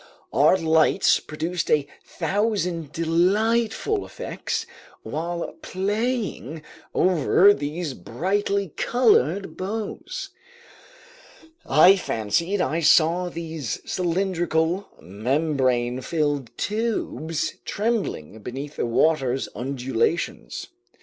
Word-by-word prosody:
Our 150 +7 +5
lights 160 -2 +3
produced 165 +3 -3
a 150 -2 +3 0.2
thousand 185 -7 -1
delightful 215 - +1
effects - - -4 0.4
while 170 +2 -4
playing 205 - -2 0.3
over 185 +3 +5
these 150 0 -4
brightly 195 - -1
colored 195 - +2
boughs. 210 +3 -5 1.4
I 180 +6 +7
fancied 170 - -1
I 165 -2 0
saw 170 +3 +4
these 160 -7 -4
cylindrical, 175 0 0
membrane 125 - 0
filled 145 -4 -1
tubes 205 -8 -2
trembling 200 - -2
beneath 135 +7 -7
the - - 0
water's 135 0 +1
undulations. 135 - -2
165 Hz, 80 wpm, -24 LUFS, 145-195 Hz, 1.4 s, I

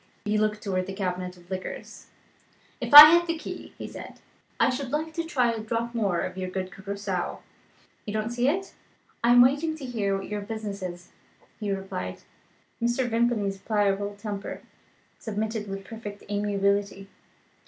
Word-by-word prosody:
He 210 0 0
looked 210 0 0
towards 185 -3 -1
the 195 - -5
cabinet 180 -2 -3
of 175 +1 -19
liqueurs. 185 0 -7 0.7
"If - - -3
I 295 +1 +14
had 345 0 +4
the 330 0 -1
key," - - -8
he - - -6
said, - - -10 0.4
"I - - +4
should 255 0 -4
like 315 +2 -2
to 335 - -2
try 250 -7 +1
a 225 - -4
drop 230 +2 -3
more 200 -7 0
of 185 0 -4
your 185 0 -3
good 185 0 -4
Curacoa. 195 -1 -4 0.7
You - - -2
don't 215 +1 -2
see 240 +1 0
it?" 385 +5 -2 0.5
"I 235 - +3
am 245 0 +8
waiting 290 +5 +2
to 280 - -7
hear 205 -6 -1
what 195 - -7
your 210 0 -4
business 210 -1 -5
is," 180 -1 -7 0.5
Hugh 205 -3 -1
replied. 90 - -6 0.6
Mr. 240 +2 +1
Vimpany's 225 -4 0
pliable 205 -1 0
temper 205 -1 -6 0.6
submitted 220 0 -3
with 195 0 -6
perfect 205 -1 -8
amiability. 200 -1 0
210 Hz, 165 wpm, -26 LUFS, 195-240 Hz, 0.7 s, I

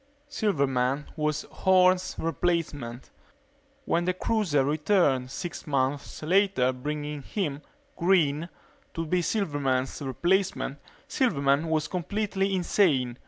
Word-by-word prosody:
Silverman 140 - 0
was 150 -1 -1
Horne's 185 0 +3
replacement. 155 -7 -2 0.7
When 170 +1 +1
the 180 0 0
cruiser 185 -10 +1
returned 150 -4 +2
six 170 +6 -6
months 140 +1 -1
later 180 -7 +2
bringing 150 +2 -4
him, 150 -3 -3 0.3
Green, 170 -3 +2 0.5
to 165 - -2
be 180 +3 +1
Silverman's 145 - -1
replacement, 170 +1 0 0.3
Silverman 145 - +1
was 155 -1 +1
completely 195 +1 -1
insane. 145 - +1
155 Hz, 100 wpm, -27 LUFS, 140-185 Hz, 0.7 s, Horne's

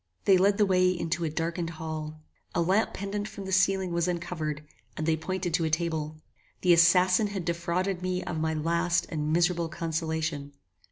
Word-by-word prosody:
They 195 - +6
led 200 +2 +3
the 210 - +4
way 185 -1 +3
into 170 -1 -2
a - - -1
darkened 165 +2 -2
hall. 155 -1 -6 0.3
A 175 - +2
lamp 195 +6 +2
pendant 205 +1 -3
from 200 - -8
the 190 - -5
ceiling 190 0 +2
was 170 0 +1
uncovered, 165 -4 -3 0.3
and 155 - -2
they 160 0 +2
pointed 175 +2 -3
to 170 -1 +2
a 160 - +1
table. 160 -1 -1 0.5
The 180 -1 +5
assassin 180 +4 +5
had 195 -4 -5
defrauded 175 +2 -1
me 185 0 -2
of 160 - -4
my 160 0 0
last 170 +2 +1
and 155 -1 -2
miserable 170 0 +2
consolation. 160 -3 -3
170 Hz, 180 wpm, -28 LUFS, 160-185 Hz, 0.5 s, They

